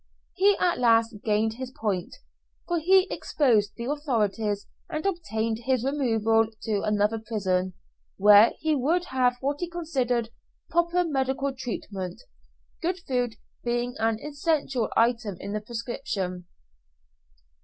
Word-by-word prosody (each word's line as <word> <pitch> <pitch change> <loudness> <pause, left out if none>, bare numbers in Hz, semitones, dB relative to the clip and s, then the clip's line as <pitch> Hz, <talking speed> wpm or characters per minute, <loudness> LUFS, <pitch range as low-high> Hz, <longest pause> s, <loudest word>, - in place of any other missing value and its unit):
He 400 +1 +4
at 355 -1 +2
last 230 -2 +3
gained 220 0 +1
his 260 -1 -5
point, 205 -8 -3 0.5
for 345 -1 +1
he 375 +3 +5
exposed 220 -9 +1
the 235 - -5
authorities 225 -8 -1 0.2
and 310 0 -4
obtained 230 - -1
his 255 0 0
removal 225 -5 +2 0.2
to 210 -3 0
another 210 +1 +1
prison, 190 -5 -1 0.4
where 210 +2 +7
he 315 0 0
would 325 +7 +1
have 250 -1 +2
what 285 +2 -1
he 350 - -3
considered 255 -9 -1 0.4
proper 345 +1 +2
medical 270 -3 -1
treatment 200 -7 -5 0.6
good 360 +2 -1
food 245 -3 0 0.3
being 240 +1 -1
an 225 0 +1
essential 285 -5 -1
item 230 -4 +2
in 200 - -5
the 210 - -2
prescription. 210 -6 -4
240 Hz, 125 wpm, -26 LUFS, 215-290 Hz, 0.6 s, where